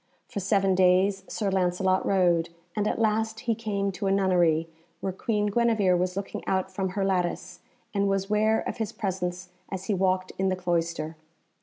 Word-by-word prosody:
For - - -4
seven 195 0 +2
days 185 +2 +3
Sir 205 -3 -2
Lancelot 185 0 +1
rode, 175 -4 +3 0.3
and 210 0 0
at - - -1
last 220 0 0
he 235 -2 +1
came 205 -3 -2
to 195 +1 -3
a - - +2
nunnery, 175 -5 +3 0.3
where 190 - -3
Queen 210 +2 -1
Guenevere 210 -3 +3
was 180 +1 -1
looking 200 - -4
out 190 -1 0
from 190 -2 -2
her 195 +1 -1
lattice, 180 -2 -1 0.3
and 200 -1 +1
was 195 0 0
ware 215 +1 +2
of - - -4
his 220 -2 -2
presence 180 -3 -3 0.2
as 190 -1 -5
he 205 - 0
walked 185 -1 +1
in 190 0 +2
the 185 - +1
cloister. 170 -3 -2
190 Hz, 180 wpm, -27 LUFS, 180-205 Hz, 0.3 s, days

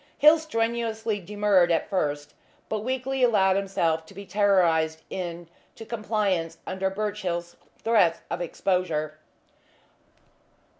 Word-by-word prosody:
Hill 305 +2 +7
strenuously 230 -6 -1
demurred 200 -2 +2
at 165 - +1
first, 150 -7 -2 0.4
but 215 - -1
weakly 260 +3 -2
allowed 200 -6 +4
himself 170 -5 0
to 195 - -15
be 200 +1 -8
terrorised 170 -6 +2
into 175 +4 -8
compliance 200 -7 -1
under 190 0 -1
Birchill's 190 -4 -3 0.3
threats 200 -8 +3
of - - -2
exposure. 165 -4 -1
195 Hz, 105 wpm, -26 LUFS, 170-215 Hz, 0.4 s, Hill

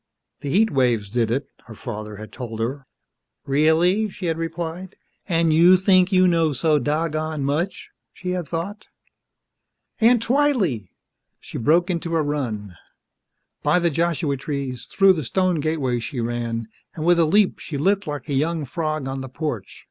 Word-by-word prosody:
The 145 - -5
heat 215 +9 +3
waves 120 -7 +1
did 115 -1 +1
it, 135 +5 -1 0.2
her 115 - -10
father 105 -2 -6
had 110 +1 -10
told 115 -4 -7
her. 135 +4 -3 0.6
"Really?" 160 +9 +3
she 190 -1 -7
had 165 -1 0
replied, 165 +3 -5 0.3
and 165 -2 +3
you 175 +4 +7
think 185 0 +4
you 185 -1 +5
know 165 -3 +2
so 150 +3 +2
doggone 155 +1 -1
much, 155 +7 -2 0.2
she 180 0 -5
had 180 -3 -3
thought. 190 +6 -4 1.1
"Aunt 230 0 +4
Twylee!" 230 - +1 0.5
She - - -7
broke 170 - +3
into 170 -1 -2
a 160 - +2
run. 115 -10 -3 0.9
By 150 +4 +3
the 170 -1 +2
Joshua 165 -2 0
trees, 135 -2 -4
through 195 -1 +5
the 160 -4 -3
stone 185 +5 +1
gateway 145 -5 0
she 120 +3 -5
ran, 115 -1 -2 0.3
and 155 - -4
with 175 0 +4
a 165 - +5
leap 200 +5 +3
she 150 - -5
lit 195 +6 +1
like 145 0 -5
a 145 - -3
young 155 +3 0
frog 155 0 -3
on 135 0 -4
the 130 - -7
porch. 125 - -5
155 Hz, 165 wpm, -22 LUFS, 130-175 Hz, 1.1 s, you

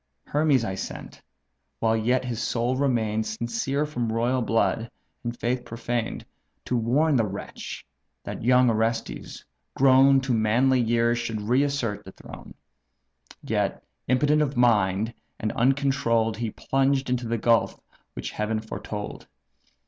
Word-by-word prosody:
Hermes 145 -5 +2
I 95 - -3
sent, 95 - -7 0.6
while 115 0 +2
yet 125 +3 +1
his 120 -2 -3
soul 120 +2 0
remain'd 115 -5 +1
Sincere 120 +6 -2
from 120 -7 -3
royal 120 +3 +1
blood, 115 0 +1 0.3
and 120 0 -5
faith 125 +1 -1
profaned; 115 0 -3 0.4
To 125 - -1
warn 135 +7 +2
the 115 - +3
wretch, 100 +1 -7 0.4
that - - -6
young 125 +1 +5
Orestes, 115 +1 -2 0.3
grown 135 +1 +6
To 130 -1 -1
manly 120 +4 +3
years, 120 0 +2
should 115 -2 -3
re 120 +6 +2
assert 140 -7 -1
the - - -12
throne. - - -12 0.9
Yet, - - -1 0.2
impotent 145 +4 +3
of 145 -3 -1
mind, 110 -2 +2 0.3
and 110 - -1
uncontroll'd, 125 -4 +1
He 115 -1 -2
plunged 135 +4 0
into 125 -1 -1
the 115 +1 0
gulf 115 +1 +2 0.3
which - - -5
Heaven 110 +1 -1
foretold." 105 -1 -6
120 Hz, 135 wpm, -25 LUFS, 110-130 Hz, 0.9 s, grown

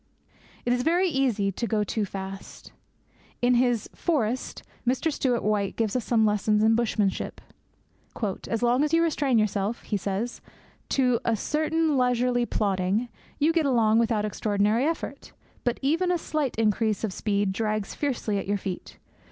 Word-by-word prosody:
It 245 - +2
is 245 - +1
very 345 +7 +2
easy 250 - +1
to 235 +5 -3
go 210 0 +1
too 210 +1 -1
fast. 195 0 -8 0.7
In 245 +1 +3
his 245 -2 +2
Forest, 260 -7 -1 0.2
Mr. 260 +6 0
Stewart 250 -4 0
White 205 -2 0
gives 225 -1 -1
us 250 - 0
some 225 -2 +3
lessons 210 0 +2
in 225 +1 +5
bushmanship. 215 -4 0 1.1
'As 230 0 -1
long 245 +3 +3
as 300 +1 -1
you 335 - +4
restrain 285 -6 +1
yourself,' 215 +1 0
he 210 - -1
says, 200 +5 -3 0.5
'to 250 -3 +2
a 230 - +1
certain 310 +4 0
leisurely 245 -1 +2
plodding, 200 +3 0 0.3
you 310 +3 +3
get 325 -3 +2
along 225 -4 +3
without 225 -2 +1
extraordinary 210 +3 +1
effort; 330 +1 -4 0.3
but 245 -1 0
even 330 +6 +2
a 355 - +2
slight 305 -5 -2
increase 220 -1 +1
of 210 -4 -1
speed 200 -2 0
drags 215 0 -2
fiercely 235 -8 -1
at - - -6
your 205 +1 +1
feet. 190 -2 -6
230 Hz, 160 wpm, -26 LUFS, 210-260 Hz, 1.1 s, in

